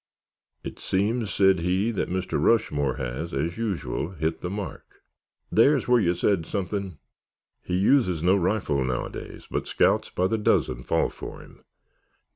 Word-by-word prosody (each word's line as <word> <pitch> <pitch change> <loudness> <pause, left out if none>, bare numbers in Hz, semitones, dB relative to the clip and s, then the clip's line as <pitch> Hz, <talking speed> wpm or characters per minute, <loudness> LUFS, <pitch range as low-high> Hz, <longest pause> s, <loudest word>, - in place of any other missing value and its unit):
"It - - -7
seems," 105 +3 0
said 95 -2 +4
he, 95 +6 +1
"that 105 - -2
Mr. 90 +1 -1
Rushmore 75 - +2
has, 70 +5 -4
as 85 +9 -2
usual, 95 -7 -2
hit 80 -1 -2
the 90 - -3
mark——" 100 0 -7 0.5
"There's 140 +5 +4
where 125 -1 +5
you 90 -2 +2
said 90 -5 +1
something!" 100 -3 -3 0.6
"He 90 - -2
uses 95 - +3
no 90 +2 +5
rifle 90 -7 0
nowadays, 65 -1 -5
but - - -2
scouts - - +2
by 90 - 0
the 110 +4 0
dozen 65 -11 +1
fall - - 0
for - - -9
him. - - -17
95 Hz, 150 wpm, -25 LUFS, 80-105 Hz, 0.6 s, where